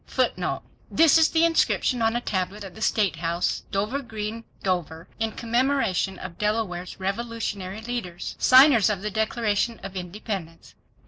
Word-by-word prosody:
This 325 Hz, 0 st, +5 dB
is 320 Hz, -, +5 dB
the 325 Hz, 0 st, +3 dB
inscription 300 Hz, -6 st, +2 dB
on 225 Hz, +1 st, +2 dB
a 240 Hz, -, 0 dB
tablet 195 Hz, 0 st, -2 dB
at 190 Hz, -2 st, -9 dB
the 220 Hz, -, -12 dB
State 205 Hz, -6 st, +1 dB
House, 170 Hz, +1 st, -1 dB
Dover 210 Hz, +8 st, -1 dB
Green, 225 Hz, -1 st, -5 dB, 0.2 s
Dover, 170 Hz, -3 st, -2 dB
in 225 Hz, 0 st, 0 dB
commemoration 235 Hz, -6 st, 0 dB
of 180 Hz, -2 st, -9 dB
Delaware's 210 Hz, -4 st, -2 dB
revolutionary 200 Hz, -1 st, -3 dB
leaders. 225 Hz, -7 st, -5 dB
Signers 255 Hz, -4 st, +7 dB
of 200 Hz, -2 st, -2 dB
the 210 Hz, -, -2 dB
Declaration 220 Hz, +1 st, 0 dB
of 195 Hz, 0 st, -7 dB
Independence. 180 Hz, -2 st, -6 dB
210 Hz, 140 wpm, -25 LUFS, 185-235 Hz, 0.2 s, Signers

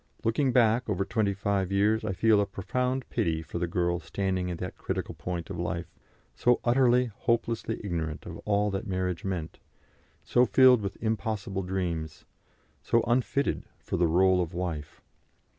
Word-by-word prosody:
Looking 130 Hz, +4 st, +2 dB
back 120 Hz, -1 st, +3 dB
over 100 Hz, -1 st, 0 dB
twenty 105 Hz, -3 st, 0 dB
five 100 Hz, -1 st, -1 dB
years, 105 Hz, +3 st, +2 dB
I 95 Hz, -, -1 dB
feel 110 Hz, +2 st, +4 dB
a 100 Hz, -, -1 dB
profound 125 Hz, +7 st, -2 dB
pity 80 Hz, -1 st, 0 dB
for 85 Hz, -, -5 dB
the 85 Hz, -, 0 dB
girl 85 Hz, 0 st, 0 dB
standing 95 Hz, +1 st, -2 dB
at 85 Hz, -, -3 dB
that 90 Hz, +1 st, -5 dB
critical -, -, -4 dB
point 90 Hz, 0 st, -5 dB
of 90 Hz, -, -5 dB
life, 85 Hz, 0 st, -3 dB, 0.4 s
so 125 Hz, -, +3 dB
utterly, 125 Hz, -1 st, +3 dB
hopelessly 115 Hz, -1 st, -1 dB
ignorant 80 Hz, -5 st, -3 dB
of -, -, -7 dB
all 105 Hz, 0 st, +1 dB
that 95 Hz, +3 st, -3 dB
marriage 90 Hz, 0 st, -2 dB
meant, 90 Hz, -5 st, -4 dB, 0.6 s
so 125 Hz, -, +3 dB
filled 125 Hz, -1 st, +6 dB
with 100 Hz, -1 st, -4 dB
impossible 105 Hz, -2 st, -2 dB
dreams, 90 Hz, -4 st, -3 dB, 0.6 s
so 115 Hz, -, +2 dB
unfitted 125 Hz, +3 st, 0 dB
for -, -, -5 dB
the 85 Hz, -, +3 dB
rôle 90 Hz, +2 st, +4 dB
of 85 Hz, -1 st, -4 dB
wife. 85 Hz, -5 st, -4 dB
100 Hz, 160 wpm, -28 LUFS, 90-115 Hz, 0.6 s, filled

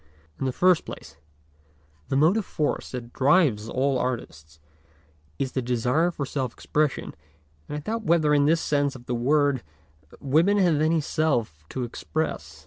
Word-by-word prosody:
In 135 Hz, -, -1 dB
the -, -, 0 dB
first 180 Hz, +5 st, +3 dB
place -, -, -10 dB, 0.9 s
the -, -, 0 dB
motive 170 Hz, +10 st, +3 dB
force 150 Hz, -5 st, -2 dB
that 120 Hz, -2 st, -7 dB
drives 135 Hz, -, +3 dB
all 135 Hz, 0 st, +1 dB
artists 80 Hz, -, -5 dB, 0.8 s
is 130 Hz, -, -2 dB
the 130 Hz, -, -1 dB
desire 125 Hz, +7 st, +1 dB
for 150 Hz, -5 st, -4 dB
self 130 Hz, -3 st, -3 dB
expression, 150 Hz, -2 st, -1 dB, 0.6 s
and 150 Hz, -, -3 dB
I -, -, -5 dB
doubt 225 Hz, +8 st, -3 dB
whether 155 Hz, -3 st, +3 dB
in 145 Hz, -1 st, +4 dB
this 165 Hz, +2 st, +3 dB
sense 145 Hz, -2 st, 0 dB
of 120 Hz, -2 st, -12 dB
the 125 Hz, -, -3 dB
word 140 Hz, +2 st, +2 dB, 0.6 s
women 160 Hz, +9 st, +3 dB
have 170 Hz, -6 st, +3 dB
any 160 Hz, +1 st, +2 dB
self 120 Hz, -, -1 dB
to 130 Hz, -, -4 dB
express. 155 Hz, +6 st, -4 dB
140 Hz, 155 wpm, -25 LUFS, 125-155 Hz, 0.9 s, in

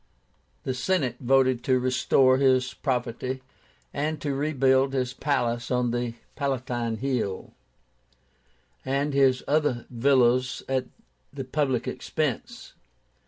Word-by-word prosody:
The 130 Hz, -, -2 dB
Senate 125 Hz, -2 st, 0 dB
voted 130 Hz, -1 st, +2 dB
to 130 Hz, -1 st, +3 dB
restore 130 Hz, +1 st, +3 dB
his 130 Hz, -2 st, +3 dB
property, 130 Hz, 0 st, -3 dB, 0.5 s
and 150 Hz, +2 st, -2 dB
to 145 Hz, -2 st, -2 dB
rebuild 135 Hz, -2 st, +2 dB
his 130 Hz, -1 st, -1 dB
palace 120 Hz, -5 st, -1 dB
on 125 Hz, -1 st, +1 dB
the 120 Hz, -1 st, -2 dB, 0.2 s
Palatine 125 Hz, -5 st, -2 dB
Hill 120 Hz, -7 st, -2 dB, 1.3 s
and 140 Hz, +2 st, -1 dB
his 135 Hz, -2 st, +3 dB
other 145 Hz, -5 st, +1 dB
villas 125 Hz, 0 st, +2 dB
at 130 Hz, -1 st, 0 dB, 0.5 s
the 140 Hz, -1 st, -5 dB
public 130 Hz, -2 st, -1 dB
expense. -, -, -3 dB
130 Hz, 110 wpm, -26 LUFS, 125-140 Hz, 1.3 s, to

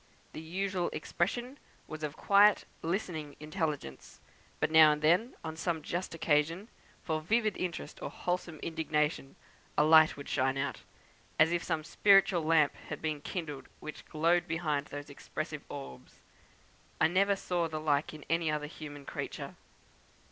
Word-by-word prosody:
The -, -, -6 dB
usual 185 Hz, +2 st, -2 dB
expression 240 Hz, -, -2 dB, 0.3 s
was 155 Hz, 0 st, -8 dB
of 150 Hz, -1 st, -4 dB
quiet, 205 Hz, +1 st, +5 dB, 0.2 s
listening 165 Hz, -4 st, -3 dB
intelligence; 150 Hz, -, -4 dB, 0.4 s
but -, -, 0 dB
now 160 Hz, -1 st, +8 dB
and 150 Hz, 0 st, -6 dB
then, 180 Hz, +11 st, +3 dB
on 160 Hz, -1 st, -5 dB
some 165 Hz, -1 st, -2 dB
just 175 Hz, +2 st, -3 dB
occasion 165 Hz, +6 st, +1 dB, 0.3 s
for 160 Hz, -2 st, -1 dB
vivid 215 Hz, +5 st, +1 dB
interest 180 Hz, -2 st, -5 dB
or -, -, -3 dB
wholesome 180 Hz, -2 st, -3 dB
indignation, 150 Hz, -3 st, -1 dB, 0.4 s
a 150 Hz, -, +6 dB
light 155 Hz, 0 st, +6 dB
would 140 Hz, -, -8 dB
shine 130 Hz, +1 st, +1 dB
out, 135 Hz, -3 st, -2 dB, 0.6 s
as 155 Hz, +1 st, +5 dB
if 175 Hz, -1 st, +1 dB
some 155 Hz, -1 st, -1 dB
spiritual 195 Hz, +1 st, +4 dB
lamp 155 Hz, -2 st, +3 dB, 0.2 s
had -, -, -4 dB
been 155 Hz, -2 st, -3 dB
kindled, 150 Hz, -5 st, -5 dB
which 155 Hz, -, -8 dB
glowed 170 Hz, +3 st, +2 dB
behind 155 Hz, -4 st, -1 dB
those 145 Hz, 0 st, -7 dB
expressive -, -, -5 dB
orbs. 65 Hz, -2 st, -9 dB, 0.8 s
I -, -, +5 dB
never 195 Hz, +4 st, +3 dB
saw 175 Hz, -3 st, -1 dB
the 155 Hz, -1 st, -4 dB
like 150 Hz, -1 st, +1 dB
in 155 Hz, -2 st, -11 dB
any 165 Hz, 0 st, +1 dB
other 150 Hz, -1 st, -1 dB
human 145 Hz, -2 st, -9 dB
creature. -, -, -5 dB
160 Hz, 150 wpm, -31 LUFS, 150-175 Hz, 0.8 s, now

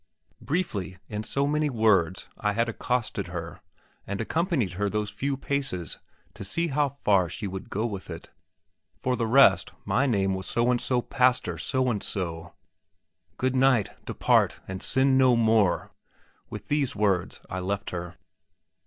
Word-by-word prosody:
Briefly, 105 Hz, -, -2 dB
in 105 Hz, -1 st, -3 dB
so 140 Hz, +5 st, 0 dB
many 150 Hz, +1 st, +1 dB
words, 100 Hz, -, +2 dB
I 105 Hz, -1 st, -1 dB
had 115 Hz, +2 st, +1 dB
accosted 115 Hz, -4 st, -2 dB
her, 85 Hz, -1 st, -6 dB, 0.5 s
and 100 Hz, 0 st, -3 dB
accompanied 145 Hz, -, 0 dB
her 100 Hz, +3 st, -1 dB
those 105 Hz, 0 st, -2 dB
few 140 Hz, 0 st, -2 dB
paces, 135 Hz, -, -3 dB, 0.3 s
to 105 Hz, -, -8 dB
see 165 Hz, -, 0 dB
how 145 Hz, 0 st, +1 dB
far 100 Hz, -10 st, +2 dB
she 110 Hz, -, -5 dB
would 95 Hz, -1 st, -6 dB
go 105 Hz, -, -2 dB
on 120 Hz, -, -1 dB
with 95 Hz, -2 st, -7 dB
it. 85 Hz, -1 st, -8 dB, 0.7 s
For 125 Hz, 0 st, 0 dB
the 115 Hz, -2 st, -1 dB
rest, 135 Hz, +5 st, +5 dB
my 140 Hz, -, +2 dB
name 100 Hz, -5 st, +1 dB
was 95 Hz, -1 st, -4 dB
So 120 Hz, +1 st, +2 dB
and 120 Hz, -, +1 dB
so 125 Hz, -2 st, +1 dB
Pastor 125 Hz, -2 st, +1 dB
So 130 Hz, -1 st, 0 dB
and 105 Hz, -3 st, -2 dB
so. 85 Hz, -3 st, -4 dB, 0.8 s
"Good 130 Hz, 0 st, 0 dB
night; 130 Hz, -6 st, +3 dB, 0.2 s
depart, -, -, +2 dB
and 95 Hz, 0 st, -5 dB
sin 130 Hz, 0 st, +3 dB
no 130 Hz, -2 st, +5 dB
more!" 110 Hz, -5 st, +2 dB, 0.6 s
With -, -, -8 dB
these 145 Hz, -5 st, 0 dB
words 100 Hz, -4 st, 0 dB
I 95 Hz, -, -4 dB
left 100 Hz, +2 st, -3 dB
her. 90 Hz, 0 st, -6 dB
110 Hz, 160 wpm, -27 LUFS, 95-130 Hz, 0.8 s, rest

